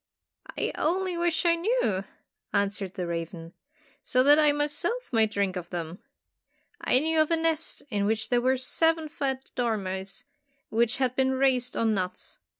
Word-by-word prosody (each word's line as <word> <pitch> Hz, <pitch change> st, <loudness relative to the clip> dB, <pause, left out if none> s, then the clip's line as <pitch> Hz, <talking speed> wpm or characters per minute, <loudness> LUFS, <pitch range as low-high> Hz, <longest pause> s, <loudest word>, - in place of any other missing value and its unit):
"I -, -, 0 dB
only 365 Hz, +3 st, 0 dB
wish 340 Hz, 0 st, 0 dB
I 340 Hz, -, +5 dB
knew!" 335 Hz, -, 0 dB, 0.5 s
answered 200 Hz, -2 st, -1 dB
the 180 Hz, -, -3 dB
raven, 165 Hz, 0 st, -5 dB, 0.5 s
"so 255 Hz, 0 st, +2 dB
that 290 Hz, +2 st, +6 dB
I 300 Hz, -1 st, +5 dB
myself 295 Hz, -, -1 dB
might 220 Hz, -2 st, +4 dB
drink 200 Hz, -3 st, -1 dB
of 175 Hz, -1 st, -6 dB
them. 170 Hz, 0 st, -5 dB, 0.8 s
I -, -, +4 dB
knew 315 Hz, +3 st, +2 dB
of 310 Hz, -, +1 dB
a 330 Hz, -, +2 dB
nest 325 Hz, -1 st, -1 dB
in 200 Hz, -1 st, +1 dB
which 220 Hz, 0 st, 0 dB
were 250 Hz, +2 st, +3 dB
seven 325 Hz, +4 st, +1 dB
fat 265 Hz, -2 st, -3 dB
dormice, 195 Hz, -5 st, -3 dB, 0.4 s
which 235 Hz, +3 st, +1 dB
had 255 Hz, -2 st, 0 dB
been 265 Hz, 0 st, +2 dB
raised 260 Hz, -2 st, +1 dB
on 225 Hz, -1 st, +2 dB
nuts. 185 Hz, -2 st, -4 dB
255 Hz, 155 wpm, -27 LUFS, 200-310 Hz, 0.8 s, that